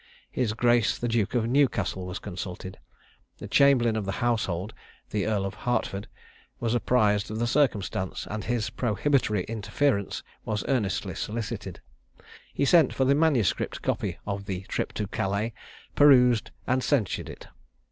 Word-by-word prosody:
His 120 -4 0
grace 120 0 +2
the 120 - -2
Duke 115 -1 0
of 115 -2 +2
Newcastle 110 -8 +1
was 90 - -4
consulted. 95 +1 -7 0.6
The - - -8
chamberlain 130 -5 +4
of 110 -2 -2
the 95 - -2
household 105 -4 -1 0.4
(the 105 -1 -1
Earl 105 -3 0
of 100 - -4
Hertford) 105 -5 -2 0.5
was 115 -1 0
apprised 105 -4 +2
of 110 - -4
the 120 - 0
circumstance; 115 -8 0
and 110 0 -4
his 115 -3 -1
prohibitory 120 -3 +1
interference 105 +1 -1 0.2
was 105 -1 -3
earnestly 110 -9 0
solicited. 110 -4 -5 0.7
He 140 - 0
sent 160 -2 +5
for 130 - +2
the 135 - +4
manuscript 140 - +1
copy - - -1
of 100 -1 -4
"The 95 -2 -3
Trip - - -3
to 105 - -2
Calais." 100 +3 -2 0.4
perused, 125 -5 +5 0.2
and 130 0 +1
censured 120 - 0
it. - - -10
110 Hz, 145 wpm, -27 LUFS, 100-125 Hz, 0.7 s, sent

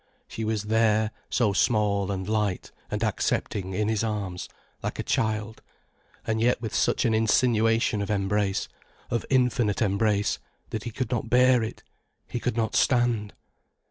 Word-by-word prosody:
She 110 - -5
was 110 -1 -1
there 110 0 +2 0.2
so 110 -5 +2
small 100 -2 +2
and 95 -1 -3
light 105 -3 -1 0.2
and 105 +1 -2
accepting 95 -3 -1
in 105 +1 0
his 110 -1 0
arms, 100 -5 -3 0.3
like - - -4
a - - -2
child, 110 0 -1 0.6
and 110 0 0
yet 120 +2 +3
with 115 -3 -5
such - - +1
an 115 - +2
insinuation 115 -1 +2
of 100 - -3
embrace, 100 -1 0 0.4
of 115 - -1
infinite 125 -5 +2
embrace, 105 -1 +1 0.3
that 110 - -4
he - - -2
could 125 +1 -3
not 120 - -2
bear 125 0 +5
it, 110 - -5 0.4
he 120 - -3
could 125 -1 -2
not 110 -2 0
stand. 120 -4 +2
110 Hz, 155 wpm, -26 LUFS, 105-115 Hz, 0.6 s, bear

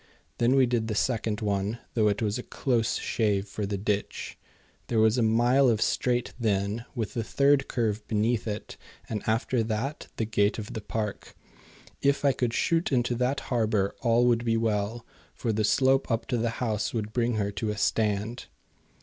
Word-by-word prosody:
Then 120 +3 +3
we 135 -1 +5
did 120 -2 0
the 110 - -2
second 110 -1 0
one, 100 +1 -1 0.2
though 110 -2 +3
it 105 +2 0
was 105 +2 -1
a - - -2
close 120 -3 0
shave 105 -3 0
for 105 0 -4
the 100 0 -2
ditch. 100 +1 -2 0.5
There 115 - -1
was 110 +2 +4
a - - +3
mile 120 +4 +4
of 110 -3 +2
straight 125 +1 0
then 105 +1 0
with 115 -4 -3
the 115 - -2
third 140 +3 +3
curve 110 -3 -1
beneath 110 +2 0
it, 105 0 -5 0.3
and 105 -2 -3
after 115 +2 +1
that 110 +6 -3
the 110 - -1
gate 105 -1 +1
of 110 -2 -6
the 110 - -4
park. 105 -1 -4 0.7
If 140 +1 +2
I 140 - +6
could 125 -2 -1
shoot 165 -1 +1
into 120 -2 +1
that 125 +3 0
harbour 110 -4 +1
all 120 0 +3
would 120 -1 +3
be 115 -1 +1
well, 110 +1 -1 0.3
for 115 -3 -1
the 110 +1 0
slope 135 +4 +3
up 115 -2 0
to 120 - +1
the 115 +1 +1
house 110 -2 -1
would 110 -1 -3
bring 120 0 +1
her 100 -1 -1
to 100 +2 -3
a 105 - -3
stand. 105 +2 0
115 Hz, 190 wpm, -27 LUFS, 105-120 Hz, 0.7 s, I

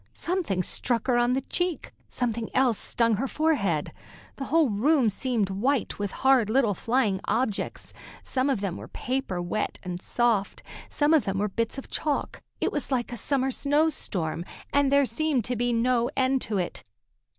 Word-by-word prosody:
Something 335 - -1
struck 235 +5 +1
her 250 - +2
on 240 +1 +3
the 265 - 0
cheek, 355 +1 -2 0.2
something 230 -2 -2
else 255 -4 +3
stung 230 -3 +2
her 270 +5 -1
forehead. 250 - 0 0.4
The 270 - -4
whole 315 -4 +3
room 250 +4 +3
seemed 215 -2 -1
white 245 +6 0
with 205 -1 -1 0.2
hard 260 -5 +5
little 230 -3 +3
flying 220 -2 0
objects. 225 -4 -2 0.3
Some 260 +1 0
of 255 -8 0
them 195 -4 -2
were - - -8
of - - -18
paper, 250 -8 -2
wet 210 +5 -2
and 180 -1 -5
soft, 230 -5 0 0.3
some 295 +1 +2 0.2
were 205 +2 +1
bits 230 +6 -2
of 270 - -8
chalk. 295 -3 -2 0.2
It - - 0
was 290 - -2
like 245 -3 0
a - - -4
summer 265 +3 0
snow 295 +4 +2
storm, 170 - -3 0.3
and 285 -1 +3
there 280 0 +5
seemed 265 -1 0
to 250 - -2
be 245 +1 0
no 240 +1 +2
end 260 0 +2
to 210 -2 -2
it. 180 -2 -3
245 Hz, 175 wpm, -26 LUFS, 210-270 Hz, 0.4 s, hard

